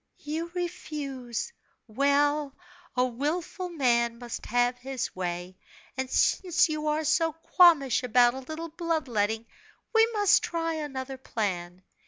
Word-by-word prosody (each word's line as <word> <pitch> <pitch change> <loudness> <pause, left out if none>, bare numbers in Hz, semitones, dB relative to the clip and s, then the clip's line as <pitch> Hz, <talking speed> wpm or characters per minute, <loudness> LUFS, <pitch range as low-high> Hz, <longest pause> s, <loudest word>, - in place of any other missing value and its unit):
"You 320 +3 -4
refuse! 300 - -4 0.3
Well, 285 +4 +1 0.4
a 250 - +4
willful 315 +9 -3
man 235 -7 +1
must 240 -1 -7
have 245 +1 +2
him 265 +1 -7 0.2
way; 180 0 -5 0.4
and 260 0 -3
since 355 +5 +3
you 305 0 -2
are 305 +1 +1
so 325 +1 +2 0.2
qualmish 305 -10 +6
about 245 0 +4
a 265 - -6
little 315 +5 -6
bloodletting, 255 - -1 0.5
we 450 0 +6
must 415 -2 +4
try 330 -1 -2
another 270 -4 -5
plan. 185 -7 -3
275 Hz, 125 wpm, -28 LUFS, 240-325 Hz, 0.5 s, qualmish